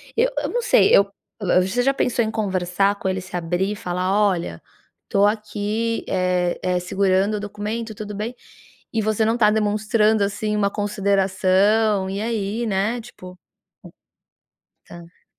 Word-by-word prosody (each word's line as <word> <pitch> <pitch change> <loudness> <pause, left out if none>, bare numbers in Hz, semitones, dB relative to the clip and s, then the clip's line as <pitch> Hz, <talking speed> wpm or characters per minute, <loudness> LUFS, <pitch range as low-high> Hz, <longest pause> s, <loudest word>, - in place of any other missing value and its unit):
Eu - - +3
eu - - -1
não 485 - -1
sei. 480 - +5
Eu 200 0 +4 0.3
eh, 185 -2 +3
você 190 +7 0
já 275 +2 +3
pensou 245 -3 0
em 220 - -2
conversar 195 -1 0
com 190 - -1
ele, 185 0 -2
se 180 0 -9
abrir 175 +3 -1
e - - -3
falar: 180 -3 -3 0.2
"Olha, 170 - -3 0.5
tô 200 0 +3
aqui, 215 +2 -1
eh 180 -1 0
eh, 180 -1 +1
segurando 195 +3 +1
o - - -4
documento, 210 +2 -5
tudo 210 -1 -7
bem? 225 +4 -4 0.6
E 225 - +1
você 215 +1 +1
não 225 +2 +1
tá 210 -3 +5
demonstrando, 215 0 +2
assim, 210 +1 -2
uma 200 -1 +1
consideração. 200 0 +1
E, 200 +2 -3
aí?", 225 0 -2
né, 215 +4 0
tipo. 185 -5 -12 1.6
Hum. 170 -1 -11
Tá. 170 - -30
205 Hz, 160 wpm, -22 LUFS, 190-220 Hz, 1.6 s, sei